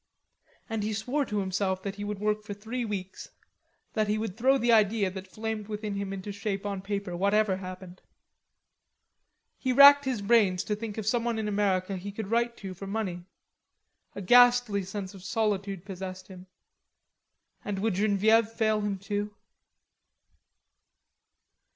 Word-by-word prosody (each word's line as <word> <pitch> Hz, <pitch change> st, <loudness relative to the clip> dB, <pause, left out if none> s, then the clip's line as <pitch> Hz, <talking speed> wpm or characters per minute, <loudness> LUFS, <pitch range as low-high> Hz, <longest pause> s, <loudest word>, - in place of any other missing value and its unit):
And 225 Hz, -2 st, -3 dB
he 215 Hz, +1 st, -2 dB
swore 250 Hz, +7 st, -1 dB
to 210 Hz, -, -3 dB
himself 190 Hz, -1 st, -1 dB
that 200 Hz, 0 st, -5 dB
he 205 Hz, -, -5 dB
would 205 Hz, 0 st, -4 dB
work 210 Hz, +1 st, 0 dB
for 210 Hz, -1 st, -7 dB
three 225 Hz, +5 st, -4 dB
weeks, 195 Hz, -4 st, -5 dB, 0.6 s
that 215 Hz, -1 st, +1 dB
he 210 Hz, +1 st, +1 dB
would 215 Hz, -4 st, -4 dB
throw 260 Hz, +4 st, +3 dB
the 240 Hz, -2 st, +2 dB
idea 210 Hz, -3 st, +3 dB
that 190 Hz, 0 st, -8 dB
flamed 215 Hz, +1 st, -5 dB
within 210 Hz, -1 st, -4 dB
him 200 Hz, -1 st, -3 dB
into 195 Hz, +1 st, -5 dB
shape 200 Hz, -1 st, -4 dB
on 200 Hz, -2 st, -3 dB
paper, 200 Hz, -2 st, -4 dB
whatever 200 Hz, +1 st, +2 dB
happened. 185 Hz, -1 st, -9 dB, 1.6 s
He 260 Hz, -, 0 dB
racked 280 Hz, +2 st, +8 dB
his 250 Hz, -6 st, -2 dB
brains 200 Hz, -4 st, +3 dB
to 210 Hz, -, -2 dB
think 215 Hz, 0 st, -6 dB
of 220 Hz, -, -4 dB
someone 235 Hz, +1 st, 0 dB
in 220 Hz, -1 st, -2 dB
America 195 Hz, -2 st, 0 dB
he 200 Hz, +3 st, -6 dB
could 205 Hz, 0 st, -6 dB
write 235 Hz, 0 st, +1 dB
to 190 Hz, -2 st, -7 dB
for 195 Hz, +2 st, -9 dB
money, 195 Hz, -4 st, -3 dB, 0.9 s
A 200 Hz, -, -6 dB
ghastly 245 Hz, -1 st, +5 dB
sense 190 Hz, 0 st, -6 dB
of 190 Hz, -2 st, -12 dB
solitude 200 Hz, -3 st, -1 dB
possessed 185 Hz, -1 st, -7 dB
him. 185 Hz, 0 st, -12 dB, 1.2 s
And 205 Hz, -1 st, -3 dB
would 215 Hz, +2 st, 0 dB
Genevieve 215 Hz, +3 st, +3 dB
fail 220 Hz, -1 st, 0 dB
him 205 Hz, -1 st, -2 dB
too? 205 Hz, +1 st, -4 dB
205 Hz, 155 wpm, -28 LUFS, 195-220 Hz, 1.6 s, racked